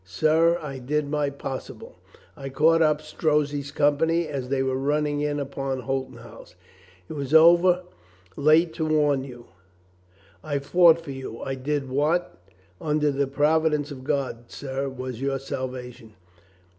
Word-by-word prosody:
Sir, 155 - +2
I 135 -3 -6
did 145 +4 -1
my 150 -1 0
possible. 135 -1 -8 0.4
I 135 0 -7
caught 160 +5 +3
up 155 -1 +2
Strozzi's 150 -2 -1
company 155 +4 +1
as 135 -4 -5
they 135 -1 +1
were 130 0 -1
running 145 +2 0
in 145 0 -1
upon 135 -1 -4
Holton 135 0 -3
House. - - -14 0.5
It - - -7
was 140 0 -2
over 175 +2 +6 0.5
late 160 +3 +3
to 160 - -2
warn 145 -3 +2
you. 120 -3 -11 1.0
I 145 -2 -2
fought 170 +4 +5
for 155 -4 -8
you. 130 -4 -7
I 135 - -3
did 135 +1 -2
what, 150 +7 0 0.5
under 150 -1 +1
the 140 0 0
provi 155 +3 +2
dence 150 -1 -2
of 130 -2 -9
God, 130 -4 -3
sir, 135 0 -4
was 130 -2 -7
your 135 0 0
salvation. 125 -4 -7
145 Hz, 150 wpm, -25 LUFS, 135-155 Hz, 1.0 s, over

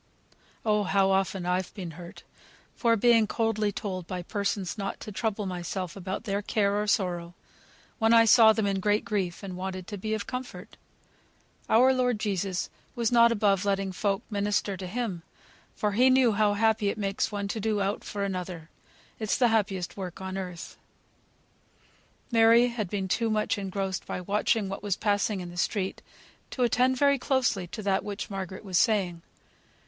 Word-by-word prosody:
Oh! 210 -1 +3
how 195 +1 +3
often 190 -1 0
I've 180 +1 -1
been 180 -5 -6
hurt, 170 +2 -11 0.6
by 230 -2 +4
being 230 0 +4
coldly 215 -2 0
told 185 -4 -5
by 180 -1 -4
persons 200 -2 -2
not 195 -2 -4
to 215 - -7
trouble 210 0 -2
myself 180 0 -4
about 190 +2 -5
their 200 -2 -1
care, 205 -1 +1
or 210 - -3
sorrow, 175 -4 -1 0.6
when 225 -1 +3
I 230 0 +7
saw 225 -1 +7
them 220 -1 0
in 195 -1 0
great 210 +2 +1
grief, 190 -4 -2
and 190 -2 -6
wanted 185 0 -5
to 205 +1 -7
be 215 +3 -2
of 210 - -4
comfort. 250 0 -7 0.9
Our 255 +4 +5
Lord 250 -3 +1
Jesus 195 -3 -2 0.2
was 235 -1 0
not 235 -1 +6
above 205 -4 +2
letting 195 -1 0
folk 195 +1 -1
minister 205 -1 0
to 185 0 -6
Him, 205 -4 -3 0.5
for 210 - 0
He 250 +6 +4
knew 260 -2 +5
how 205 0 +2
happy 220 -1 +2
it - - -3
makes 200 0 -1
one 200 -1 -3
to 220 - -3
do 215 0 0
aught 200 +1 -1
for 200 -1 -4
another. 180 -4 -5 0.5
It's 215 -2 0
the 245 -3 +4
happiest 195 -5 -1
work 185 -2 -6
on 190 0 -5
earth." 180 -3 -6 1.5
Mary 230 +1 +6
had 220 -6 -4
been 195 -1 -2
too 225 +5 0
much 215 0 +1
engrossed 195 -1 -3
by - - -3
watching 210 +3 +1
what 195 +1 -5
was 205 -2 -1
passing 205 -1 0
in 175 -1 -7
the 175 - -11
street 190 +1 -1 0.5
to 255 - -1
attend 250 +2 +2
very 280 0 +3
closely 245 -9 0
to 215 +5 -7
that 195 -1 +1
which 205 0 -5
Margaret 190 0 -5
was 185 -2 +1
saying. 190 -7 +1
200 Hz, 175 wpm, -27 LUFS, 190-220 Hz, 1.5 s, I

